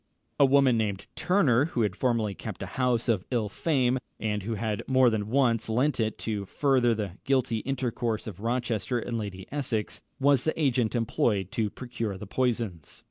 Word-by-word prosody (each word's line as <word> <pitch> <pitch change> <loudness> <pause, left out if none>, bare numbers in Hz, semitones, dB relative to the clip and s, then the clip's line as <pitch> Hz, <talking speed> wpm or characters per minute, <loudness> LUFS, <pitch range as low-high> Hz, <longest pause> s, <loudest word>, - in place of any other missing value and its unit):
A 140 - +7
woman 135 -3 +4
named 100 -3 -2
Turner, 145 -9 +3
who 135 -7 -2
had 100 -3 -1
formerly 115 -4 0
kept - - -7
a - - -8
house 125 -2 +1
of 110 -6 +2
ill 115 -5 0
fame, 130 0 +1 0.2
and 105 -1 -1
who 110 +4 -3
had 105 0 -2
more 130 -2 +5
than 105 -1 -2
once 120 -4 +2
lent 125 +5 +1
it 110 -1 0
to 105 -3 -2
further 125 0 +2
the 105 -4 -3
guilty 130 -4 +1
intercourse 120 -4 -2
of 100 -5 -7
Rochester 120 +1 -1
and 120 0 -3
Lady 95 -3 -6
Essex, 130 -7 -2 0.2
was 140 -2 +4
the 160 - -1
agent 125 -6 +1
employed 105 -4 0
to 110 -2 0
procure 115 -4 -5
the 105 - -8
poisons. 110 - -2
115 Hz, 180 wpm, -28 LUFS, 105-130 Hz, 0.2 s, A